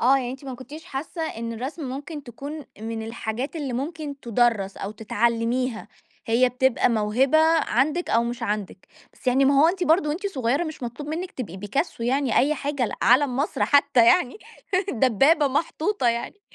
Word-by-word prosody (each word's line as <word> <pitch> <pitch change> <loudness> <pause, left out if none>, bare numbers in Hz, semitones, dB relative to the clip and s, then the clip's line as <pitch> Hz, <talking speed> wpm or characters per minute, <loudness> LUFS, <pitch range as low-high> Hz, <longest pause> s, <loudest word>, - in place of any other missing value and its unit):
آه. 260 +3 +5
يعني 245 -2 -3
أنتِ 265 +2 -9
ما 265 -2 -5
كنتيش 285 +5 -10
حاسّة 305 +5 -5
إن 230 -7 -4
الرسم 265 +8 -5
ممكن 290 +4 -6
تكون 280 +5 -8 0.2
من 225 0 -4
الحاجات 230 +5 -4
اللي 285 -5 -3
ممكن 285 +2 -5
تُدَرّس 230 -5 +1
أو 195 - -5
تتعلّميها. 230 +3 -1 0.4
هي 235 +3 +3
بتبقى 255 0 +2
موهبة 235 +6 +2 0.3
عندِك 300 +9 +1
أو 230 +1 +3
مش 240 +1 -4
عندِك. 205 -4 -4 0.2
بس - - -21
يعني 260 +2 +4
ما 275 0 +4
هو 320 - +6
أنتِ 360 +1 -1
برضه 320 -1 +3
وأنتِ 340 +8 -2
صغيرة 275 -3 0
مش 315 -4 -7
مطلوب 245 +5 -6
منِّك 345 +4 -4
تبقي 195 -9 -6
بيكاسو 205 - -3
يعني 255 0 +1
أي 290 +4 +3
حاجة 280 -3 -1
ل - - -5
عَلَم 255 +1 +4
مصر 285 +4 0
حتّى 280 -5 +4
يعني، 275 - +3 0.5
دبّابة 270 +6 +3
محطوطة 315 - 0
يعني. 235 - -3
260 Hz, 175 wpm, -24 LUFS, 235-295 Hz, 0.5 s, هو